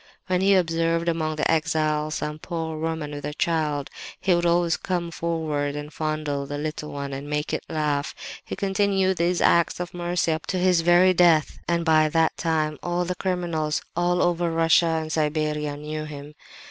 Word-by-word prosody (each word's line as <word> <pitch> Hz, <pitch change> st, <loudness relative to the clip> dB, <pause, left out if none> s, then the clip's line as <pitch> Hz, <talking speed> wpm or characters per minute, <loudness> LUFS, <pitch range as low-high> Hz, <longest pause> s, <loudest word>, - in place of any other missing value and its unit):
When 185 Hz, 0 st, 0 dB
he 195 Hz, +1 st, +5 dB
observed 165 Hz, -1 st, +1 dB
among 160 Hz, -2 st, 0 dB
the 155 Hz, -, +1 dB
exiles 155 Hz, -1 st, 0 dB
some 150 Hz, 0 st, -4 dB
poor 160 Hz, -2 st, -4 dB
woman 160 Hz, -2 st, -3 dB
with 145 Hz, 0 st, -7 dB
a 150 Hz, 0 st, -4 dB
child, 150 Hz, -5 st, -1 dB, 0.3 s
he 185 Hz, -, +2 dB
would 175 Hz, 0 st, +2 dB
always 170 Hz, -1 st, +2 dB
come 175 Hz, -2 st, -3 dB
forward 155 Hz, -4 st, -2 dB
and 150 Hz, 0 st, -6 dB
fondle 155 Hz, -3 st, -2 dB
the 145 Hz, +1 st, -4 dB
little 150 Hz, 0 st, -4 dB
one, 140 Hz, -1 st, -5 dB
and 140 Hz, +2 st, -6 dB
make 150 Hz, 0 st, -2 dB
it -, -, -2 dB
laugh. 150 Hz, -3 st, -1 dB, 0.3 s
He -, -, -6 dB
continued 195 Hz, -1 st, +1 dB
these 175 Hz, +1 st, +1 dB
acts 170 Hz, 0 st, +3 dB
of 175 Hz, -1 st, -5 dB
mercy 175 Hz, -1 st, 0 dB
up 160 Hz, +1 st, -3 dB
to 185 Hz, -, -1 dB
his 180 Hz, -2 st, +3 dB
very 175 Hz, +2 st, +5 dB
death; 170 Hz, -4 st, +3 dB
and 170 Hz, -1 st, 0 dB
by 155 Hz, -1 st, +4 dB
that 165 Hz, +1 st, +2 dB
time 155 Hz, -2 st, -1 dB
all 175 Hz, 0 st, -1 dB
the 180 Hz, -, -2 dB
criminals, 170 Hz, -4 st, -2 dB
all 175 Hz, +1 st, +2 dB
over 175 Hz, -1 st, +1 dB
Russia 165 Hz, +1 st, +4 dB
and 160 Hz, -1 st, -1 dB
Siberia, 150 Hz, -1 st, -1 dB
knew 155 Hz, +1 st, -5 dB
him! 145 Hz, 0 st, -9 dB
160 Hz, 185 wpm, -24 LUFS, 150-175 Hz, 0.3 s, he